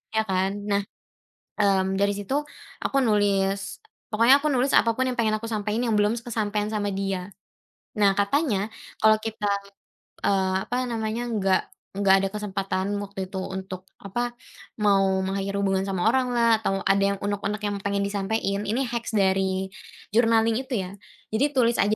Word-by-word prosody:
Ya 220 - +3
kan? 190 0 +1 0.2
Nah, 200 0 +3 0.8
mmm 190 -1 +2
dari 200 0 +2
situ 265 +9 -1 0.4
aku 275 - 0
nulis, 200 -2 +1 0.3
pokoknya 235 +6 +5
aku 300 - +1
nulis 260 +2 +1
apa 230 - +5
pun 260 - +2
yang - - -1
pengen 215 -1 +2
aku 230 - -8
sampein 215 +1 -1
yang 230 - +1
belum 210 +1 +3
s 230 - -7
kesampaian 210 -3 -1
sama 205 -1 0
dia. 195 -1 -3 0.7
Nah 200 -1 +5
katanya 205 -1 +1 0.3
kalau 215 0 +6
kita, 220 -1 -3 0.8
eee, 190 -1 +2
apa 245 - -1
namanya, 230 0 -2
nggak 190 -3 +2 0.3
nggak 195 -1 +5
ada 195 - 0
kesempatan 195 -2 -2 0.2
waktu 200 -1 -9
itu 190 - -3
untuk 190 0 -6 0.2
apa 240 +5 -3 0.5
mau 195 -2 +3
mengakhiri 195 +1 -2
hubungan 195 -1 +1
sama 190 -2 -1
oranglah 240 -3 +3
atau 195 -3 -1
ada 195 0 +3 0.2
yang - - -10
uneg-uneg 205 +1 -2
yang 205 -1 -1
pengen 200 0 0
disampein, 200 0 -1
ini 230 +6 0
hacks 235 -1 -3
dari 190 -1 +1 0.4
journaling 225 0 +4
itu 260 0 -7
ya. 180 - -7 0.4
Jadi 220 +6 +2
tulis 235 -2 +3
aja 205 +2 +3
205 Hz, 160 wpm, -25 LUFS, 195-225 Hz, 0.8 s, kalau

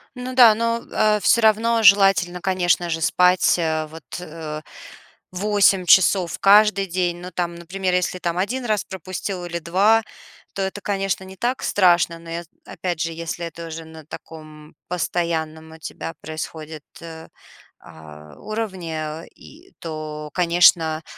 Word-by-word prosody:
Ну 250 +1 -6
да, 240 -4 +8
но, 230 +1 -1
а 215 -1 +2
всё 230 +4 +3
равно 225 +1 +3
желательно, 195 -3 +4
конечно 175 -2 +1
же, 165 0 -2
спать, 180 +3 +3 0.3
вот, 160 +1 -12 0.2
э, 155 -3 -7 0.7
8 195 0 +2
часов 185 -1 +4
каждый 205 0 +5
день. 175 -1 -1
Ну, 180 +1 -9
там, 175 -1 -3
например, 180 +2 -3
если, 180 0 0
там, 170 -1 -2
1 240 +7 -2
раз 215 -3 0
пропустил 185 0 -6
или 170 0 -4
2, 195 +7 +3 0.5
то 195 - -4
это, 190 +1 -3
конечно, 195 -2 -2
не 190 0 -11
так 245 +6 -2
страшно, 175 -3 +2
но, 165 0 -13
я 170 +1 -4 0.2
опять 175 -3 -4
же, 165 - -1
если 170 +1 -5
это 165 0 -8
уже 165 0 -7
на 160 -1 -13
таком 155 -1 -12
постоянном 160 -3 -3
у - - -12
тебя 160 +1 -7
происходит, 155 -1 -7 0.2
э, 160 -1 -10 1.1
уровне, 190 -7 -5 0.3
э, - - -19
и 345 +5 -17
то, 155 -2 -6
конечно, 170 -2 +3
180 Hz, 145 wpm, -21 LUFS, 165-200 Hz, 1.1 s, да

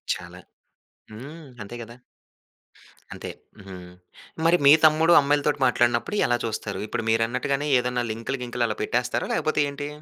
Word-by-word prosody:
చాలా. 90 +1 -11 0.7
హ్మ్. 145 +7 -10 0.2
అంతే 105 +4 -9
కదా! 115 +1 -12 1.2
అంతే. - - -8 0.3
హుహు. 95 -2 -10 0.7
మరి 175 +1 +5
మీ 140 - +9
తమ్ముడు 160 +2 +5
అమ్మాయిలతోటి 145 0 0
మాట్లాడినప్పుడు 120 - +1
ఎలా 120 - +1
చూస్తారు? 110 -2 -4
ఇప్పుడు 115 - -4
మీరన్నట్టుగానే 130 +6 0
ఏదైనా 125 0 -2
లింకులు 115 +4 -4
గింకులు 120 0 -2
అలా 110 -1 -4
పెట్టేస్తారా? 125 +2 -1
లేకపోతే 155 -1 0
ఏంటి? 145 +1 -6
125 Hz, 130 wpm, -24 LUFS, 115-145 Hz, 1.2 s, మీ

